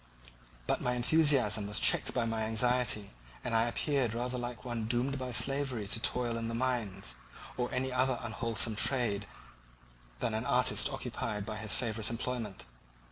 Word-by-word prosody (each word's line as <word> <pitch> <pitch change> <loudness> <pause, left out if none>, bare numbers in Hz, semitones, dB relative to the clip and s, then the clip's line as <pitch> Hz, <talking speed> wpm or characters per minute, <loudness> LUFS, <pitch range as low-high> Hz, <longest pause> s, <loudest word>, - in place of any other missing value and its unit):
But - - 0
my 125 - 0
enthusiasm 125 -5 +3
was 105 - -1
checked - - +4
by 120 -2 0
my 110 -1 -1
anxiety, 115 -2 +3 0.3
and 120 - -2
I 115 +1 +4
appeared 125 -1 0
rather 125 +1 -2
like 120 0 -6
one 115 -3 -3
doomed 125 +4 -1
by 130 -1 -4
slavery 135 -3 +1
to 110 - -1
toil 120 0 0
in 115 - -3
the 115 - -3
mines, 115 - -2 0.4
or 125 -1 -2
any 130 +1 -1
other 130 0 +2
unwholesome 115 -1 -1
trade 105 -6 +1 0.9
than 115 - -1
an 110 +2 -2
artist 125 +3 +3
occupied 115 -6 -4
by 110 0 -5
his 110 -2 -1
favourite 110 -3 0
employment. 115 -3 -4
120 Hz, 160 wpm, -32 LUFS, 110-125 Hz, 0.9 s, checked